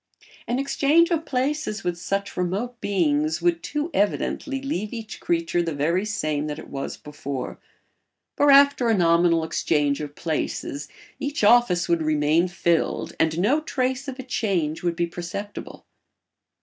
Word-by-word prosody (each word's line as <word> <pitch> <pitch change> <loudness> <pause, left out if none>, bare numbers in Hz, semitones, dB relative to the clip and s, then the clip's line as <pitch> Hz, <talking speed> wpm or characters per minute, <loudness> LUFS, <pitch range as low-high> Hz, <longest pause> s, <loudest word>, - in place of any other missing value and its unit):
An 240 - 0
exchange 285 +5 +3
of 325 -1 0
places 265 -3 -1
with 175 -1 -1
such 195 +3 -3
remote 200 +7 -2
beings 155 -5 +1
would 170 -1 +1
too 295 - -3
evidently 270 +7 0
leave 215 -7 -3
each 225 -2 -7
creature 170 0 0
the 165 -3 -2
very 170 +7 +1
same 155 -8 -1
that 150 0 -4
it - - -10
was 135 0 -4
before; 140 -3 -6 0.8
for 290 0 +4
after 280 -3 +6
a 225 - +3
nominal 170 -1 +4
exchange 150 -2 0
of 145 -1 -7
places 150 -3 -3 0.3
each 285 -3 -3
office 205 -6 +5
would 170 -1 +2
remain 155 +2 +2
filled 170 -2 0
and 160 0 +2
no 245 - +2
trace 260 -2 -2
of 265 -1 -5
a 260 - -6
change 190 -11 -1
would 175 -1 -1
be 170 0 +1
perceptible. 175 +4 -7
180 Hz, 150 wpm, -24 LUFS, 160-250 Hz, 0.8 s, after